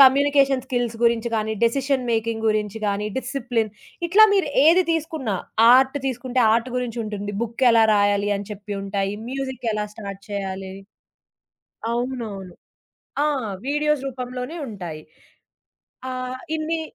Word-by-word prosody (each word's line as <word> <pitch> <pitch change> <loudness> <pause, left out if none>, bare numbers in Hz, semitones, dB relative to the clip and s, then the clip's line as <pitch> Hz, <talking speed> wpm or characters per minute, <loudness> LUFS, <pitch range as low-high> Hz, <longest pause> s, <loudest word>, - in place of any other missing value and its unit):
Communication 275 -1 +5
skills 245 -3 -1
గురించి 235 0 +3
గానీ, 220 0 0
decision 265 +2 +1
making 225 0 -1
గురించి 215 0 -1
గానీ, 205 +1 -1
డిసిప్లిన్ 245 -5 -2 0.4
ఇట్లా 415 +5 +8
మీరు 390 -6 +2 0.2
ఏది 345 +4 +6
తీసుకున్నా 310 -8 -2 0.4
ఆర్ట్ 265 +2 +4
తీసుకుంటే 255 0 -1
ఆర్ట్ 235 +3 +1
గురించుంటుంది. 215 -4 -3
బుక్కెలా 235 0 +4
రాయాలి? 205 0 +2
అని 200 - -7
చెప్పి 205 0 -7
ఉంటాయి. 195 0 -2
మ్యూజిక్ 265 -2 -4
ఎలా 210 0 -1
స్టార్ట్ 200 -3 -8
చేయాలి 190 -1 -4 1.2
అవునవును. 230 -7 -4 0.7
ఆ! - - +3 0.4
వీడియోస్ 295 -1 +1
రూపంలోనే 255 +4 -5
ఉంటాయి. 175 -7 -7 1.1
ఆహ్, 255 0 -5 0.2
ఇన్ని 320 +1 -2
235 Hz, 115 wpm, -23 LUFS, 210-265 Hz, 1.2 s, ఇట్లా